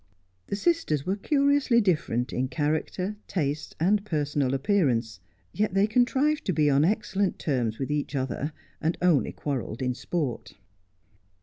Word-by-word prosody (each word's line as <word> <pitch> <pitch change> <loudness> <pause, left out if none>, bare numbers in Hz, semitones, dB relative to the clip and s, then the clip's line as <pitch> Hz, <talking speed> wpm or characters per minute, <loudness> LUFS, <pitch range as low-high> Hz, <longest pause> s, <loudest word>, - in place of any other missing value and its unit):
The - - -2
sisters 210 - 0
were 190 - 0
curiously 280 +1 +3
different 155 - 0
in 130 +1 0
character, 155 +8 -2
tastes, 150 -4 -2
and 200 +5 +2
personal 145 -7 0
appearance; 130 - +1 0.3
yet 210 -2 0
they 195 +1 +5
contrived 260 +7 +2
to 185 - +1
be 150 -2 +3
on 140 +2 +4
excellent 200 +1 0
terms 120 -7 -1
with 135 +1 -3
each 150 0 -2
other, 135 +3 -2 0.3
and 160 +2 0
only 170 -6 +3
quarrelled 130 -4 -4
in 125 0 0
sport. 125 - -3
155 Hz, 140 wpm, -27 LUFS, 135-205 Hz, 0.3 s, they